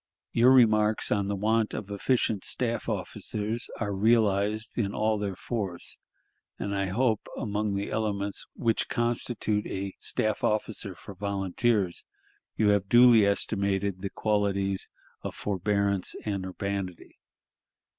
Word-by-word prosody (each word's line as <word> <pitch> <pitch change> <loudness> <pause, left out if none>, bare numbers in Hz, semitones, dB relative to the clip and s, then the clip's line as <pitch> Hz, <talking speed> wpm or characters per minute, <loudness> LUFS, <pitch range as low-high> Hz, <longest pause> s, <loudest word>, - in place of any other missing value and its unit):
"Your 120 +2 +5
remarks 110 -4 +4
on 100 -1 +1
the 100 - -1
want 110 +2 +1
of 100 -1 -6
efficient 105 -1 0
staff 120 -2 0
officers 105 +3 -3
are 100 - -1
realized 110 +1 +2
in 100 -4 -1
all 110 0 +1
their 100 -2 -2
force, 95 -4 -5 0.6
and 100 0 -3
I 100 0 0
hope, 110 +3 0
among 105 -1 -1
the 100 +1 -3
elements 100 -2 -2
which 115 -3 0
constitute 120 -3 -1
a 95 0 -4
staff 110 -1 -1
officer 105 -3 -1
for 100 - -10
volunteers, 100 0 0 0.5
you 105 -2 +3
have 100 -1 +2
duly 120 -3 +7
estimated 100 -2 0
the 100 - -3
qualities 100 -2 0 0.3
of - - -5
forbearance 100 -1 0
and 100 -3 -2
urbanity. 95 -1 -5
105 Hz, 125 wpm, -28 LUFS, 100-110 Hz, 0.6 s, duly